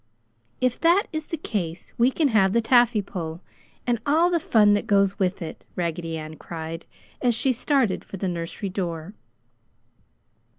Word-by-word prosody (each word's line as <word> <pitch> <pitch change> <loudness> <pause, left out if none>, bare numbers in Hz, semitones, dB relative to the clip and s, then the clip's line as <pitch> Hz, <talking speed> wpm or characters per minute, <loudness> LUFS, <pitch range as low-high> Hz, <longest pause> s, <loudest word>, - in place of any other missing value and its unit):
"If 255 -1 0
that 345 +5 +4
is 315 -1 -3
the 330 - -3
case, 180 - -4
we 240 +2 +4
can 290 +2 +1
have 195 -4 +3
the 235 - +4
taffy 235 -2 +4
pull 165 -3 -6 0.4
and 240 -2 +1
all 325 +5 +3
the 340 - +2
fun 220 - +4
that 205 - 0
goes 200 0 +3
with 185 -1 0
it!" 160 - -8
Raggedy 165 -1 -2
Ann 155 0 -8
cried, 165 +1 -7 0.3
as 245 -3 +2
she 260 +3 +2
started 255 -3 +1
for 195 - -8
the 190 - -2
nursery 175 +3 -4
door. 175 -1 -4
205 Hz, 165 wpm, -24 LUFS, 170-250 Hz, 0.4 s, that